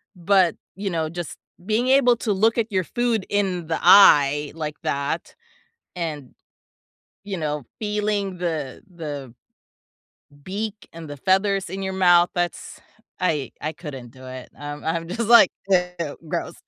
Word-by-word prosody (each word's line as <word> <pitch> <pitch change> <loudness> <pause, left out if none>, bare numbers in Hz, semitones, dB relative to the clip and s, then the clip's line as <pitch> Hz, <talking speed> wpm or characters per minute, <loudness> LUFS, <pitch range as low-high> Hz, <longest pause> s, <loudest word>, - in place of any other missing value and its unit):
but, 180 -1 +3 0.2
you 195 +1 -3
know, 160 -2 -1
just 170 -1 -6 0.3
being 220 +4 +1
able 260 -2 +5
to 225 - -2
look 225 +5 +2
at 230 -1 0
your 190 -2 +1
food 235 0 -1
in 190 -5 -1
the 160 - -1
eye 150 -6 +6
like 155 -2 -4
that, 140 +4 -2 0.6
and, 150 -6 -4 0.9
you 200 -2 -4
know, 150 -3 -3 0.2
feeling 210 -2 -1
the 160 -7 -3
the 145 -7 -7 1.1
beak 205 +4 -5
and 165 -2 -9
the 145 - -6
feathers 195 +3 +1
in 195 +2 -5
your 190 0 -3
mouth, 175 -2 +5
that's 175 -1 -3 0.4
I 155 -7 0
I 155 - -2
couldn't 135 -8 -9
do 130 +1 -14
it, 130 -1 -9
um, 145 0 -7
I'm 165 +1 -2
just 225 +5 -3
like, 235 -5 +8 0.2
"Ew, 180 -5 0
gross." - - -3
175 Hz, 145 wpm, -23 LUFS, 150-200 Hz, 1.1 s, like